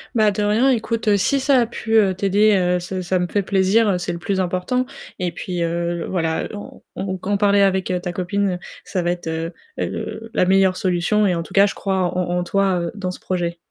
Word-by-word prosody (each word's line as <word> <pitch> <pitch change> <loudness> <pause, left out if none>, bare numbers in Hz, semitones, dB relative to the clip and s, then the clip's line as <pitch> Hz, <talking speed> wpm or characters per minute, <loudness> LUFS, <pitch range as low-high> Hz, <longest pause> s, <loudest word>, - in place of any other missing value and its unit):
Bah 215 -2 +4
de 205 +1 -2
rien, 220 +6 +3
écoute 225 -3 +1
si 275 +8 +2
ça 270 -1 +3
a - - +2
pu, 225 -1 -3
heu, 200 -4 +5
t'aider, 200 +2 +3
heu, 180 -1 +2
ça 185 +1 -4
ça 180 +1 0
me 180 - 0
fait 205 - 0
plaisir, 195 0 +2
c'est 175 0 -3
le 170 - -6
plus 190 +1 -1
important 185 +8 0 0.3
et 180 -2 -1
puis, 175 0 -4
heu, 170 0 -2
voilà 165 -3 -1
en 205 - -9
en 190 -1 -3
qu'en 200 +3 -1
parler 200 0 +3
avec 190 -1 +2
ta 175 - -3
copine, 185 0 -1 0.2
ça 185 - -2
va 175 0 0
être, 175 -2 -5
heu, 165 +1 -3 0.3
heu, 225 0 -4
la 180 - +3
meilleure 190 0 +3
solution 185 +4 +1
et 180 - +1
en 165 - -2
tout - - -13
cas, 200 0 +6
je 200 - -3
crois 195 -1 -1 0.2
en 180 -1 0
en 175 - 0
toi, 195 -1 +1
heu, 170 - -3
dans 185 -3 -3
ce - - -9
projet. 175 -2 -2
190 Hz, 230 wpm, -21 LUFS, 180-205 Hz, 0.3 s, cas